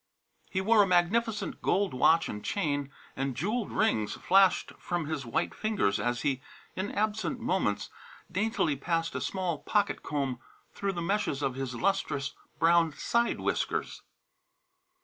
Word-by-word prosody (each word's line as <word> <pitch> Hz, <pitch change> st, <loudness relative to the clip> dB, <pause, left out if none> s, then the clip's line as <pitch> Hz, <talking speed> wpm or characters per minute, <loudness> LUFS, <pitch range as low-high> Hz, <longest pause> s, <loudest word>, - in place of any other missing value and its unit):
He 190 Hz, -, -1 dB
wore 215 Hz, +2 st, +5 dB
a 200 Hz, -, +4 dB
magnificent 205 Hz, +5 st, +1 dB
gold 200 Hz, 0 st, +1 dB
watch 160 Hz, +6 st, +4 dB
and 105 Hz, -, -6 dB
chain, 145 Hz, -7 st, -1 dB, 0.2 s
and 135 Hz, -1 st, -2 dB
jewelled 210 Hz, -, -1 dB
rings 110 Hz, -, +1 dB
flashed 190 Hz, -1 st, +3 dB
from 175 Hz, -2 st, -2 dB
his 145 Hz, -4 st, -4 dB
white 115 Hz, -, -1 dB
fingers 200 Hz, -, 0 dB
as 120 Hz, +3 st, -1 dB
he, 135 Hz, -2 st, 0 dB, 0.3 s
in 190 Hz, +2 st, -2 dB
absent 215 Hz, +4 st, -1 dB
moments, 190 Hz, -, 0 dB, 0.4 s
daintily 190 Hz, -5 st, +1 dB
passed 165 Hz, +4 st, -1 dB
a -, -, -3 dB
small 180 Hz, -5 st, -2 dB
pocket 205 Hz, -2 st, 0 dB
comb 135 Hz, -4 st, -2 dB, 0.3 s
through 200 Hz, -1 st, -2 dB
the 170 Hz, -2 st, -3 dB
meshes 180 Hz, -7 st, 0 dB
of 135 Hz, -, 0 dB
his 130 Hz, -1 st, -4 dB
lustrous 140 Hz, -3 st, 0 dB, 0.2 s
brown 165 Hz, -1 st, +4 dB
side 235 Hz, +9 st, 0 dB
whiskers. -, -, -1 dB
170 Hz, 145 wpm, -29 LUFS, 140-205 Hz, 0.4 s, wore